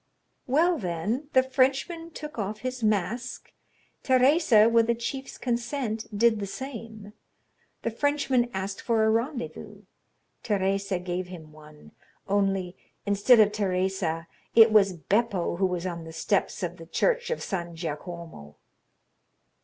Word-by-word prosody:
"Well, 325 +6 +3
then, 210 - -3
the 260 - +6
Frenchman 270 +6 0
took 300 -5 -8
off 210 +1 -3
his 255 -1 -4
mask; 215 +3 -1 0.5
Teresa, 260 -4 +5
with 230 0 +4
the 235 - +2
chief's 265 +3 -5
consent, 235 -2 -2
did 230 0 +4
the 200 - -3
same. 225 -4 -8 0.7
The 230 - -1
Frenchman 265 -1 +1
asked 195 0 -4
for 225 -2 +1
a 220 - +4
rendezvous; 240 +3 -3 0.6
Teresa 195 -2 0
gave 180 0 -4
him 165 -4 -10
one—only, 180 +5 -4 0.3
instead 205 +4 +5
of 210 -1 +6
Teresa, 190 -4 -1 0.3
it 225 -1 +8
was 200 -3 +5
Beppo 195 - 0
who 190 +1 +2
was 180 -1 -3
on 170 -2 -4
the 160 - -9
steps 195 +3 -1
of 175 0 -3
the 165 -1 -11
church 475 - +1
of 485 - -2
San 175 -4 -4
Giacomo." 165 - -7
215 Hz, 130 wpm, -27 LUFS, 185-250 Hz, 0.7 s, it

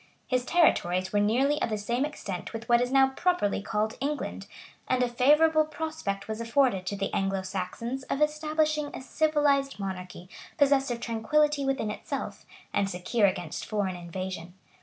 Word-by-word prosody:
His 255 -1 0
territories 185 - +2
were 205 - +3
nearly 260 +8 +2
of - - +1
the 215 - -1
same 235 +6 -1
extent 200 -12 -6
with 225 +1 -6
what 240 -1 +5
is 245 +1 -1
now 270 0 +5
properly 305 - 0
called 215 +1 -2
England; 290 +1 -3 0.4
and 255 -1 +2
a - - +2
favorable 300 +6 +4
prospect 310 -11 -4
was 220 +1 -4
afforded 230 -5 +2
to 200 - -1
the 195 0 -3
Anglo 195 -1 0
Saxons 195 +7 -4
of 275 - -2
establishing 305 0 +1
a - - -6
civilized 285 -2 +1
monarchy, 185 -2 -6 0.3
possessed 280 -2 +3
of 235 -1 -3
tranquillity 280 +6 +1
within 270 -6 0
itself, - - -6 0.3
and 200 -1 +1
secure 200 +4 +1
against 180 -4 -3
foreign 205 -4 -1
invasion. 175 0 -6
235 Hz, 160 wpm, -28 LUFS, 195-285 Hz, 0.4 s, what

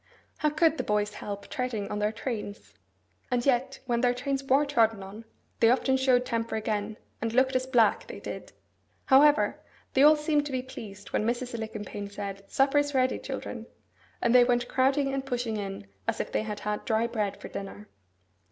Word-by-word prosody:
How 300 - +2
could 315 +1 +2
the - - 0
boys 210 0 0
help 200 -1 -6
treading 240 -6 -3
on 210 - -2
their 210 0 +1
trains? 210 - -6 0.6
And 245 -1 0
yet 265 0 +1
when 240 -2 0
their 245 -1 +3
trains 275 +2 -2
were 270 +2 +3
trodden 225 -7 +2
on, 205 +4 -10 0.3
they 225 - +6
often 265 +2 +3
showed 260 -1 +3
temper 230 -2 -2
again, 215 0 -2 0.2
and 225 0 -1
looked 260 +1 +3
as 255 0 +1
black, 235 -5 +3
they - - -8
did! - - -7 0.5
However, 290 +3 +5 0.3
they 265 - +3
all 300 +2 +8
seemed 300 -1 +1
to - - -6
be 255 -1 -2
pleased 205 -6 -10
when - - +1
Mrs. 240 +2 -2
Alicumpaine 215 -3 -5
said, 200 -1 -6
'Supper 275 +2 +3
is 290 -1 -1
ready, 255 0 +2
children!' - - -6 0.6
And 235 - +3
they 250 -1 +8
went 245 0 +1
crowding 275 +1 +2
and 275 0 -1
pushing 245 -4 -2
in, 195 - -5 0.2
as - - 0
if - - -3
they - - +1
had 210 -1 -5
had 210 0 -2
dry 225 -2 +1
bread 210 -4 -2
for - - -8
dinner. 200 +1 -7
240 Hz, 190 wpm, -28 LUFS, 210-265 Hz, 0.6 s, all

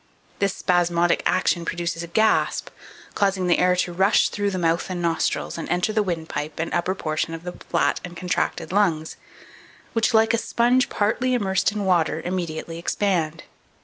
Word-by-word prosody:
This 200 -1 +1
spasmodic 175 -1 +2
action 180 -1 +1
produces 170 -1 -3
a 170 - -6
gasp, 220 +6 +1 0.4
causing 195 -2 +1
the 175 - +3
air 180 0 +4
to 180 -1 -1
rush 190 +4 +3
through 205 -1 -1
the 190 - -3
mouth 170 +1 0
and 185 -1 -3
nostrils, 170 0 -1
and - - -5
enter 180 +5 0
the 215 - +2
windpipe 160 -5 -4
and 165 - -2
upper 180 +2 0
portion 155 -1 -2
of 165 - -10
the 180 - -5
flat - - -1
and 175 -1 -8
contracted 180 -1 -2
lungs, 175 -6 +1 0.8
which, 225 +1 +2
like 225 0 +4
a 230 - +2
sponge 245 +3 +2
partly 240 +4 +1
immersed 195 -4 +1
in 205 -1 -3
water, 170 -4 +2
immediately 170 -2 -4
expand. 170 -3 -1
180 Hz, 170 wpm, -23 LUFS, 170-200 Hz, 0.8 s, air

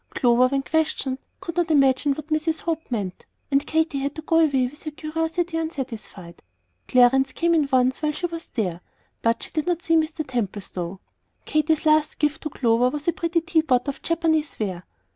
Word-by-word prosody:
Clover, 245 0 +4
when 275 +1 -1
questioned, 300 -4 -1 0.2
"could 335 -1 -6
not 350 -1 +1
imagine 275 -1 +4
what 310 +2 -9
Mrs. 310 +1 0
Hope 325 -1 -3
meant;" 200 -7 -3 0.3
and 275 +1 +3
Katy 320 -3 +1
had 280 +1 -3
to 315 - -7
go 325 +1 +3
away 280 -5 +3
with 275 +4 -8
her 310 - -4
curiosity 325 +3 -2
unsatisfied. 245 - -6 0.5
Clarence 260 +1 +4
came 340 0 +1
in 300 -4 +2
once 255 +1 +2
while 305 -1 +1
she 325 +4 -3
was 335 -1 -5
there, 180 -7 -3 0.4
but 230 0 +1
she - - -9
did 310 +1 -2
not 350 -1 0
see 330 - +2
Mr. 315 -1 0
Templestowe. 195 -6 -4 0.5
Katy's 310 +1 +1
last 310 -1 +3
gift 300 +1 0
to 305 - -3
Clover 240 -2 +2
was 295 +3 -6
a 340 - +3
pretty 335 0 0
tea 335 -1 +2
pot 260 -4 +1
of 280 - -4
Japanese 320 -2 0
ware. 185 -5 -3
300 Hz, 190 wpm, -24 LUFS, 255-320 Hz, 0.5 s, Clover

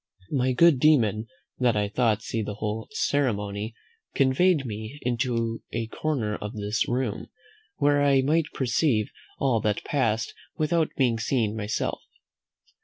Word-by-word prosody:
My 130 -2 +1
good 155 +1 +5
demon, 115 -7 +3 0.3
that 125 -4 +2
I 105 -1 0
might 110 -4 +2
see 115 - -2
the 105 -1 -4
whole 105 +1 -3
ceremony, 110 - -1 0.4
conveyed 140 +3 +3
me 110 +4 -6 0.2
to 115 -2 -1
a 115 0 -2
corner 120 -8 -1
of 105 +1 -6
this 105 0 -1
room, 125 -3 -2 0.5
where 145 -1 +3
I 140 -2 +4
might 155 +3 +2
perceive 125 -3 +1 0.3
all 125 -5 +1
that 105 -1 0
passed 115 -6 0 0.2
without 155 +1 +1
being 120 -4 +2
seen 115 -2 0
myself. 105 -1 -2
120 Hz, 135 wpm, -26 LUFS, 110-140 Hz, 0.5 s, good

